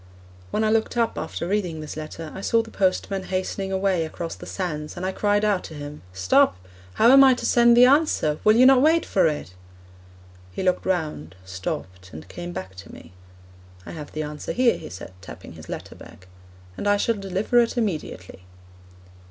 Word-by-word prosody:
When 215 - -1
I 215 - +2
looked 225 +2 0
up 230 -1 +1
after 170 - -4
reading 180 -5 -1
this 155 -1 -7
letter 155 +1 -7
I 190 - -7
saw 230 +3 +2
the 225 - -13
postman 190 0 -1
hastening 190 +1 -3
away 190 -3 +1
across 165 +1 -5
the - - -11
sands, 155 -5 -5
and 180 - -4
I 190 - -1
cried 205 +1 +1
out 205 -3 +1
to 160 - -9
him, 145 0 -8
'Stop! 90 0 +3 0.4
how 230 +3 +5
am 275 +1 +8
I 260 -1 +6
to - - -6
send 235 0 +5
the 245 - +8
answer? 260 - +2
Will 215 +1 +5
you 250 +2 +6
not 265 -1 +7
wait 320 +3 +3
for 190 - +2
it?' 145 - -4 1.0
He 90 - -5
looked 185 -1 0
round, 150 - -2
stopped, 90 0 -6
and 80 0 -10
came 175 0 -7
back 95 - -7
to 90 - -11
me. - - -14 0.7
'I - - -8
have 150 -3 -8
the 155 - -3
answer 150 0 -6
here,' 250 -1 +3
he - - -9
said, 95 +1 -10
tapping 95 - -11
his - - -13
letter - - -7
bag, 90 - -15 0.5
'and - - -3
I 205 - +4
shall 230 - +1
deliver 200 +3 0
it 235 +1 +1
immediately.' 155 - -4
185 Hz, 195 wpm, -23 LUFS, 150-220 Hz, 1.0 s, am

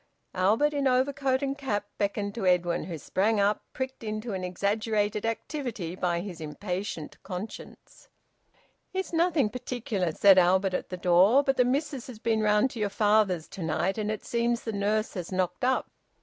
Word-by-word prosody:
Albert, 215 +11 +2
in 280 -1 +1
overcoat 265 +1 +1
and 275 0 -2
cap, 205 -7 -2
beckoned 200 0 -1
to 205 -4 -2
Edwin, 175 -1 +2
who 170 -3 -5
sprang 205 +8 0
up, 200 +1 +2
pricked 260 -2 -5
into 215 +1 -4
an 185 -1 -3
exaggerated 205 +3 0
activity 225 - -4
by 175 -2 0
his 180 -4 -7
impatient 180 +2 -5
conscience. 185 +4 -9 0.9
"It's 380 -1 -3
nothing 325 -9 +2
particular," 235 -7 -2
said 195 +3 +6
Albert 185 +2 +3
at - - -3
the 180 - -5
door. 185 +9 +5
"But 270 -1 +1
the 250 - +5
missus 275 0 -1
has 250 -4 -9
been 220 0 0
round 210 +4 +3
to 230 - -7
your 210 -1 0
father's 205 -5 +2
to 190 - -8
night, 175 +5 0
and 210 0 -1
it 215 -1 -4
seems 235 0 0
the 225 - -4
nurse 210 +2 0
has 180 -3 -5
knocked 185 +6 -1
up. 260 +1 +1
210 Hz, 175 wpm, -28 LUFS, 185-250 Hz, 0.9 s, said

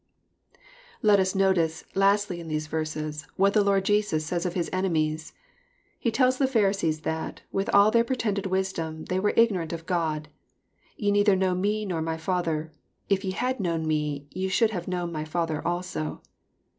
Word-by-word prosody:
Let 210 -2 +6
us 190 0 +1
notice, 175 -5 +2
lastly, 195 -2 +2
in 170 - -8
these 155 -1 -2
verses, 155 -1 -4
what 195 +1 +3
the 210 - +4
Lord 195 -1 +2
Jesus 205 -7 +1
says 175 +2 -1
of 175 - -5
His 175 -2 0
enemies. 160 -3 -1 0.7
He 235 - +1
tells 255 +2 +2
the 270 - +3
Fhariseen 195 - +1
that, 160 +1 -4
with 195 +1 -1
all 200 +1 +6
their 230 +1 +4
pretended 225 -6 -1
wisdom, 175 -4 -2
they 185 - -1
were 205 +2 +1
ignorant 190 -8 +3
of 165 -1 -6
God. 160 -4 -1 0.4
" - - -49 0.3
Ye 205 -2 +1
neither 205 -1 +4
know 185 -1 +1
Me 205 +4 0
nor 175 -5 -2
my 160 0 -2
Father: 160 -2 -1 0.4
if 195 -1 +2
ye 190 - -2
had 250 +7 -1
known 165 -4 -1
Me, 150 -2 -1
ye 190 +1 -2
should 220 +4 +2
have 175 -5 -4
known 175 -2 -2
my 155 -2 -3
Father 155 0 -2
also." 175 -3 -3
185 Hz, 180 wpm, -26 LUFS, 160-200 Hz, 0.7 s, Let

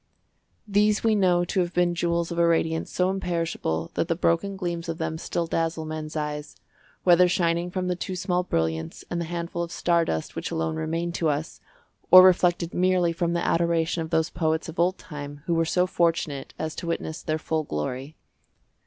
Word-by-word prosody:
These 210 +1 +2
we 225 -1 +3
know 180 -4 +3
to 190 - -1
have 175 -1 -1
been 175 0 +3
jewels 170 0 -1
of 170 - -2
a 170 - +4
radiance 160 -1 0
so 180 +1 +1
imperishable 170 - -2
that - - -1
the 165 - +1
broken 180 +4 0
gleams 175 -2 -3
of 165 - -3
them 160 -1 -3
still 170 - -2
dazzle 165 -1 -1
men's 155 0 -6
eyes, 150 -1 -4 0.5
whether 180 0 +6
shining 170 -1 +1
from 185 0 -2
the 180 - 0
two 185 +1 -4
small 180 0 0
brilliants 80 - -2
and 170 0 -1
the - - -2
handful 170 +1 -4
of 170 0 -4
star 170 -1 +2
dust 80 - -3
which - - -3
alone 80 0 -2
remain 165 +2 -2
to 165 -2 0
us, 150 +2 -3 0.5
or 185 0 +11
reflected 175 -2 +3
merely 180 -2 +2
from 170 0 -1
the 170 - -1
adoration 170 0 +1
of 160 - -4
those 160 0 +1
poets 160 -1 -1
of 165 +1 -8
old 180 +2 +2
time 145 -2 -9
who 170 - 0
were 165 0 +2
so 180 +2 +2
fortunate 165 -6 -1
as 160 0 -3
to 170 - -6
witness 165 -1 -3
their 155 -1 -1
full 160 0 -1
glory. 130 - -4
170 Hz, 195 wpm, -25 LUFS, 160-175 Hz, 0.5 s, or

